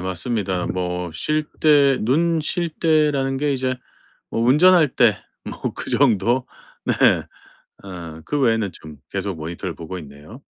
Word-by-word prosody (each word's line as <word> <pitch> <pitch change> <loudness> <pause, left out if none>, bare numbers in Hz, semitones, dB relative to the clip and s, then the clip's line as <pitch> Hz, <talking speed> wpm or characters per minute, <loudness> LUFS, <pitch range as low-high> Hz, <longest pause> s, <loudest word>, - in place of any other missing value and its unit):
맞습니다. 95 0 -2
뭐 90 -1 -3
쉴 155 - -1 0.2
때 145 -3 +5
눈 160 +8 +2
쉴 175 +2 -1
때라는 150 -4 +1
게 145 +1 0
이제 130 -1 -1 0.5
뭐 - - -2
운전할 155 +7 +5
때 - - +4 0.3
뭐 - - -5
그 - - -5
정도 120 +6 +2 0.4
네 - - +1 0.9
어 85 -4 -8
그 145 - -2
외에는 115 -6 +1
좀 80 -1 -12 0.2
계속 100 -2 -3
모니터를 85 +3 -5
보고 85 +3 -7
있네요. 75 - -12
115 Hz, 240 characters per minute, -21 LUFS, 90-145 Hz, 0.9 s, 때